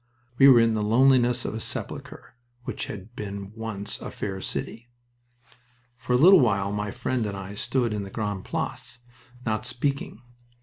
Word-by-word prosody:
We 135 - +9
were 130 -3 +8
in 115 -1 +4
the 110 - 0
loneliness 125 +2 +4
of - - -3
a 110 - -4
sepulcher - - -6 0.3
which - - -4
had 105 +4 -9
been 100 -1 -6
once 110 -3 -4
a - - -5
fair 95 -2 -5
city. 120 +4 -5 1.1
For 125 0 -3
a - - +5
little 180 +7 +8
while 100 -6 +2
my 105 0 -2
friend 120 +4 -2
and 100 -1 -4
I 100 +1 -7
stood 120 +2 0
in 105 - -2
the 100 - -6
Grande 105 -2 -3
Place, 120 -1 -4 0.4
not 110 -1 -1
speaking. 125 -1 -2
115 Hz, 170 wpm, -26 LUFS, 100-125 Hz, 1.1 s, We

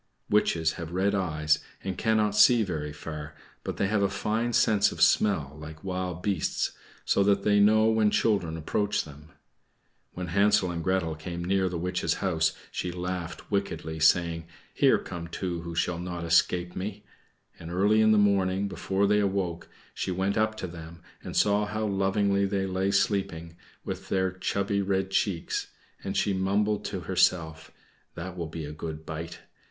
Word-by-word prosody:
Witches 80 -6 +2
have 85 0 -6
red 95 +2 +1
eyes 75 -5 +1 0.2
and 95 -1 -3
cannot 110 +1 +2
see 115 +2 +6
very 75 -6 -3
far; 75 0 -7 0.3
but - - -4
they - - +1
have 105 +1 +1
a 100 - +2
fine 110 +4 -1
sense 105 -3 +3
of - - -8
smell, 75 -9 +3
like 80 +1 -10
wild 90 -2 -4
beasts, 100 -6 0 0.3
so - - +2
that 100 0 +2
they 105 -1 +4
know 110 +2 +5
when 110 -1 +3
children 100 -7 +1
approach 105 +6 0
them. 75 +1 -13 0.8
When 90 -1 -5
Hansel 100 0 +3
and 85 -1 -4
Gretel 95 -2 0
came 85 +2 -6
near 95 0 +1
the 90 - -4
witch's 90 -1 -1
house 80 -4 +1 0.2
she 90 - -3
laughed 90 +1 -5
wickedly, 90 -5 -2
saying, 80 0 +3 0.3
"Here - - +4
come 85 -1 -7
two 85 0 -4
who 85 0 -7
shall 85 +1 0
not 90 -1 -5
escape 90 +1 +2
me." 100 +2 -5 0.6
And 80 - -8
early 100 +5 +3
in 110 0 +5
the 110 - +5
morning, 100 -1 +2
before 95 0 -1
they 105 +1 +3
awoke, 95 -4 -1 0.2
she - - -3
went 95 +2 0
up 110 0 +1
to 95 - -5
them, 85 0 -10 0.2
and - - -5
saw 105 0 +3
how 110 +1 -2
lovingly 100 0 +1
they 95 -1 -1
lay 95 +1 0
sleeping, 95 -5 0 0.3
with - - -6
their 95 -1 +1
chubby 100 +2 -1
red 95 -1 -1
cheeks; 95 -3 -1 0.4
and - - -3
she 100 - +1
mumbled 100 +2 +1
to 95 -3 -4
herself, 85 -3 +1 0.5
"That 90 +2 -6
will 85 -3 -4
be 80 0 -6
a 75 - -6
good 80 0 -7
bite." 80 +2 -6
95 Hz, 170 wpm, -27 LUFS, 85-100 Hz, 0.8 s, see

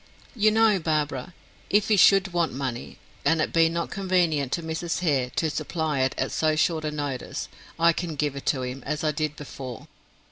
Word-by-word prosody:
"You 215 -2 +4
know, 220 -2 +4
Barbara, 150 -2 -1 0.4
if 210 +1 +2
he 215 - +5
should 195 -1 +5
want 170 -2 +1
money, 130 -3 -5 0.3
and 160 +3 +3
it 155 - 0
be 165 -1 +5
not 170 0 -3
convenient 175 -8 +1
to 170 - -1
Mrs. 160 +2 -3
Hare 140 -7 +1
to 165 - +1
supply 155 -1 -2
it 130 0 +1
at - - -1
so 155 -1 +1
short 160 0 +1
a 155 - -1
notice, 145 -4 -4 0.3
I 170 0 +5
can 165 -1 -4
give 145 -1 -1
it 140 - -8
to 130 -3 +1
him, 125 +2 -5
as 150 +1 -2
I 155 - +2
did 155 -1 -2
before." 130 -4 -8
155 Hz, 200 wpm, -25 LUFS, 140-175 Hz, 0.4 s, he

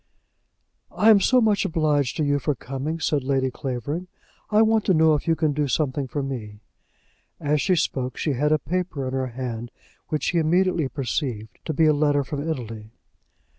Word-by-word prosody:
"I'm 215 -1 +5
so 255 +6 +4
much 215 -3 +2
obliged 150 -5 0
to 155 - +1
you 145 0 +1
for 145 +2 -1
coming," 135 +6 -4
said 150 -3 0
Lady 130 -1 0
Clavering. 135 +8 -4 0.4
"I 215 +1 +5
want 220 -1 +3
to 190 - +3
know 160 0 +5
if 150 - -2
you 165 - +3
can 155 -2 +1
do 145 0 0
something 140 0 -1
for 140 +3 -3
me." 110 -6 -6 0.8
As 145 0 +1
she 185 - +2
spoke, 130 -6 -1
she 150 - 0
had 150 +4 +1
a 155 - +5
paper 170 -5 -3
in 130 - -4
her 130 -1 -1
hand 120 -1 -5 0.4
which 150 -3 -1
he 175 - +1
immediately 170 -1 +2
perceived 125 -4 -4
to 160 - -2
be 160 - +4
a 155 - +5
letter 145 -1 +2
from 145 +2 -4
Italy. 115 -7 -5
145 Hz, 185 wpm, -24 LUFS, 130-160 Hz, 0.8 s, I'm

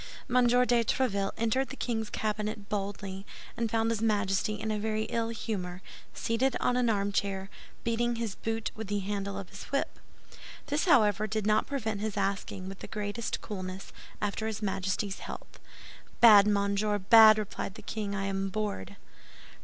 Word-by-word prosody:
M. 250 -2 +4
de 245 -1 +4
Tréville 200 -5 0
entered 255 +4 +1
the - - -6
king's 220 -5 -2
cabinet 210 -1 -3
boldly, 195 -1 -4 0.3
and 230 -1 -1
found 225 +1 +1
his 225 -2 -1
Majesty 205 -1 +1
in 220 - -2
a 210 - -1
very 215 0 -1
ill 230 0 -1
humor, 190 -5 -4 0.3
seated 240 +3 0
on 250 - +1
an 250 -1 +2
armchair, 200 -2 -1 0.3
beating 235 +1 0
his 230 -3 -3
boot 225 +2 -3
with 220 -1 -7
the 205 0 -1
handle 200 0 -3
of 195 -2 -7
his 195 - -9
whip. 275 +1 -2 0.7
This, 290 +4 0
however, 215 - +4
did 215 0 -2
not 215 0 +3
prevent 220 -7 -2
his 215 -1 -3
asking, 195 -1 -2
with 195 0 -8
the - - -8
greatest 210 +1 -3
coolness, 185 -2 -6 0.3
after 210 +2 -1
his 215 -1 -4
Majesty's 195 0 -1
health. - - -9 0.6
"Bad, 210 -3 +9
monsieur, 200 0 +1
bad!" 215 +2 +8
replied 205 -2 -4
the - - -11
king; 210 -2 -3
"I 195 0 -2
am 195 0 -1
bored." 205 -1 -3
210 Hz, 165 wpm, -30 LUFS, 200-225 Hz, 0.7 s, Bad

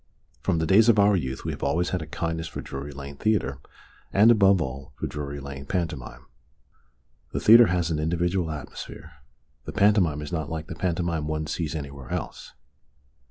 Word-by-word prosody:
From - - +1
the 80 - 0
days 105 +7 +5
of 115 - +5
our 100 0 +5
youth 65 -7 -3
we - - -1
have - - -8
always 80 +5 +1
had 90 - -2
a 80 - -7
kindness 80 0 -3
for - - -7
Drury 70 +1 -6
Lane 70 0 -9
Theatre, 100 -11 0 0.5
and, 105 +4 +6
above 100 -4 +5
all, 65 -2 -5
for - - -5
Drury 70 -1 -5
Lane 70 0 -8
pantomime. 70 -8 -4 1.1
The - - -1
theatre 115 +1 +8
has 85 -2 0
an 75 - 0
individual 85 +2 0
atmosphere, 75 +1 -8 0.5
the - - -5
pantomime 95 -8 +3
is 75 - -7
not 80 -3 -2
like 80 -1 -4
the 80 - -7
pantomime 85 -2 -1
one 80 0 -2
sees 80 0 -3
anywhere 70 -4 -7
else. - - -5
80 Hz, 180 wpm, -26 LUFS, 70-90 Hz, 1.1 s, theatre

